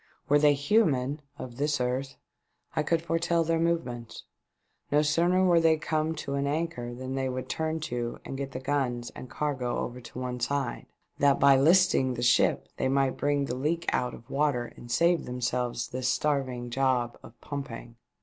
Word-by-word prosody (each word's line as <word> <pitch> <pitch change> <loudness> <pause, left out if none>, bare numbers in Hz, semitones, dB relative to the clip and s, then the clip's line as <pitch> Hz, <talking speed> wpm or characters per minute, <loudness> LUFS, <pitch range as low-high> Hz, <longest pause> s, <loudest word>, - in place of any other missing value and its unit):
" - - -37
Were 145 +1 +5
they 145 -1 +5
human 145 - +2
— 140 - -41
of 120 -3 -8
this 145 0 0
earth 130 +2 -2 0.3
— - - -33
I 155 - +2
could 165 +2 0
foretell 170 0 +1
their 165 0 +1
movements. 165 -9 -2 0.7
No 150 +1 +4
sooner 175 +5 +3
were 175 -2 +5
they 160 -1 +4
come 155 +1 -1
to 145 -2 -5
an 140 0 0
anchor 145 -6 -2
than 130 +1 -5
they 135 -1 -1
would 130 0 -4
turn 160 0 -2
to 120 -6 -3
and - - -5
get 135 0 -4
the 130 - -5
guns 130 -3 -1
and 130 - -10
cargo 135 -5 -2
over 125 +1 -4
to 120 - -11
one 125 -1 -4
side, 135 +1 -2 0.3
that 140 -1 +4
by 140 0 +7
listing 140 -3 +4
the 120 - -3
ship 125 +1 +3
they - - 0
might 135 0 +2
bring 145 -1 +1
the 125 - -3
leak 155 +6 -1
out 125 -1 0
of 115 - -15
water 135 -4 0
and 120 - -12
save 170 +6 +3
themselves 125 -1 -2
this 130 0 -2
starving 130 -3 -1
job 125 -2 0
of 120 - -15
pumping. 130 -5 -7
140 Hz, 190 wpm, -28 LUFS, 125-155 Hz, 0.7 s, by